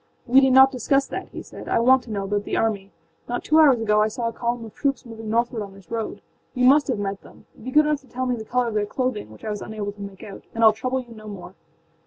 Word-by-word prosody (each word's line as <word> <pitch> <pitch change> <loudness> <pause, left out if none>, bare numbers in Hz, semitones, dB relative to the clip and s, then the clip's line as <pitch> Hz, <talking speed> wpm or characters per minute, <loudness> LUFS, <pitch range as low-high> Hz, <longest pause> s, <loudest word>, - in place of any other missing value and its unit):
âWe 260 +3 +6
need 265 - +4
not 265 +1 +8
discuss 275 +1 +1
that,â - - -6
he - - -8
said; - - -11
âI 230 - +1
want 260 0 +6
to 245 - -15
know 200 -2 -2
about 205 +1 -1
the - - -2
army. 200 -3 -1 0.4
Not 245 - -2
two 310 +1 +4
hours 280 -6 +6
ago 210 -1 +3
I 215 - +3
saw 230 +2 -3
a - - -9
column 235 0 -3
of 220 - -12
troops 275 -3 -1
moving 225 -2 -8
northward 235 0 0
on 200 -1 -8
this 195 0 -18
road. 225 -1 -4 0.3
You 250 0 +2
must 285 +3 +5
have 255 -5 0
met 200 -1 -3
them. - - -17 0.2
Be 255 - -5
good 300 +3 +5
enough 300 -1 0
to 270 - -22
tell 255 +1 -3
me 250 -1 0
the 220 - -6
color 245 +2 0
of - - -6
their 210 -1 0
clothing, 250 - -2
which 110 - -13
I 215 - -2
was 210 - -5
unable 210 -2 -5
to 205 0 -14
make 200 -1 -9
out, 200 - -9
and 230 - 0
Iâll 220 -1 +8
trouble 255 +4 -2
you 240 -2 -13
no 215 -1 -12
more. 190 -3 -9
230 Hz, 290 wpm, -23 LUFS, 210-255 Hz, 0.4 s, not